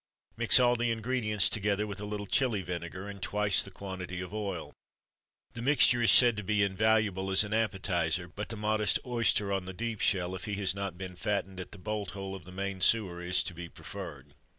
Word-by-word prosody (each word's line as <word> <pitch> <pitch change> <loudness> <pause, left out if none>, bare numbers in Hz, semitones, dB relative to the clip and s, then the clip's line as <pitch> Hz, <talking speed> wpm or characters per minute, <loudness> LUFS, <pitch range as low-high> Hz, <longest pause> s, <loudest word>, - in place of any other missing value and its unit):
Mix 120 +2 +5
all 120 -1 +4
the 120 0 0
ingredients 115 -2 +1
together 105 0 0
with 105 0 -6
a - - -4
little 105 0 -4
Chili 110 -2 +1
vinegar, 90 +2 -6
and 100 -1 -8
twice 100 -2 +2
the - - -4
quantity 95 -2 -6
of 90 +1 -7
oil. 100 -6 -4 0.8
The 115 - -6
mixture 125 -2 +5
is 115 - +5
said 120 -2 +7
to 105 - -3
be 105 +1 +1
invaluable 100 -1 +1
as 95 +2 +4
an 105 +1 -5
appetiser; 90 -5 0
but 100 +4 -7
the 115 - -5
modest 105 -1 +1
oyster 115 -5 +1
on 95 -2 -2
the 95 - -6
deep 115 +2 -4
shell 90 -1 +1
if 95 - -6
he 105 -2 -3
has 95 -2 0
not 100 -3 -5
been 90 -1 -7
fattened 95 0 -2
at 90 - -7
the - - -11
bolt 105 +1 -4
hole 95 0 -5
of 95 - -9
the 90 - -11
main 95 0 -4
sewer 95 -6 +3
is 90 +1 +1
to - - -5
be 85 0 -8
preferred. 70 -2 -9
100 Hz, 215 wpm, -30 LUFS, 95-110 Hz, 0.8 s, said